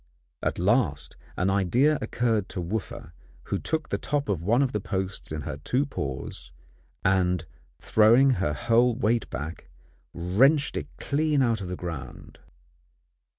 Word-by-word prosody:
At - - -1
last - - +1 0.2
an 90 +2 +1
idea 120 - +3
occurred 115 -5 0
to - - -5
Wooffa, 90 -3 -4 0.3
who - - -2
took 160 -1 -2
the - - -1
top 145 -5 -2
of 95 -5 0
one 115 +10 +3
of 130 - 0
the 105 - -1
posts 95 -3 -4
in 80 -1 -3
her 75 -1 -5
two 125 - 0
paws, 70 - -6 0.5
and 90 -3 +2 0.3
throwing, 115 +5 +5
her 75 -5 +1
whole 120 +5 +3
weight 115 -1 0
back, 75 +6 -6 0.4
wrenched 130 - +2
it - - -3
clean 150 -1 +1
out 115 -4 +1
of 95 - -5
the 90 - -4
ground. 80 -9 -8
105 Hz, 150 wpm, -26 LUFS, 90-125 Hz, 0.5 s, throwing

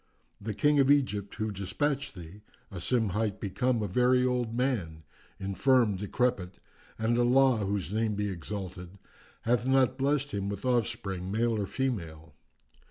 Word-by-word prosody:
The 105 0 -4
King 145 +3 +3
of 135 0 +4
Egypt 115 -9 +1
who 110 0 -2
despatched 135 +8 -2
thee, 90 +3 -11 0.3
Asim 105 +4 0
hight, 105 +2 0
hath 105 - -21
become 120 +3 0
a - - -1
very 125 +5 +3
old 125 -2 0
man, 110 -11 -2 0.4
infirm, 105 +3 +2
decrepit; 100 -1 -1 0.4
and 115 +2 +1
Allah 130 +1 +4
(whose 100 -2 -2
name 110 -1 0
be 105 0 -1
exalted!) 95 0 -6 0.5
hath 120 +1 +1
not 130 0 +3
blessed 140 +1 +1
him 100 0 -2
with 100 +2 -5
offspring, 95 -6 -1
male 115 +3 +1
or 100 -2 -2
female. 85 - -4
110 Hz, 150 wpm, -29 LUFS, 95-125 Hz, 0.5 s, of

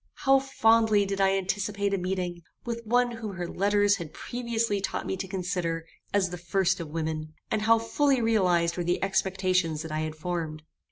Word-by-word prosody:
How 270 0 +6
fondly 225 -5 +3
did 195 0 -2
I 195 0 +4
anticipate 200 +1 -1
a - - +2
meeting 180 -1 -3 0.2
with 235 -1 -3
one 245 +1 +3
whom 225 -4 -6
her 175 -1 -4
letters 205 +2 +2
had 160 -2 -8
previously 230 -4 -2
taught - - -3
me - - -2
to 190 - -4
consider 175 -3 -2 0.3
as 190 -3 +1
the 180 - -6
first 190 +2 +1
of 165 - -5
women, 155 -1 -4 0.2
and 215 - +1
how 225 +1 +5
fully 270 +4 +2
realized 180 -7 +2
were 175 - -1
the 175 +2 0
expectations 185 -4 +1
that 160 - -7
I 155 - -1
had 155 0 -3
formed! 155 -2 -4
190 Hz, 185 wpm, -27 LUFS, 175-215 Hz, 0.3 s, How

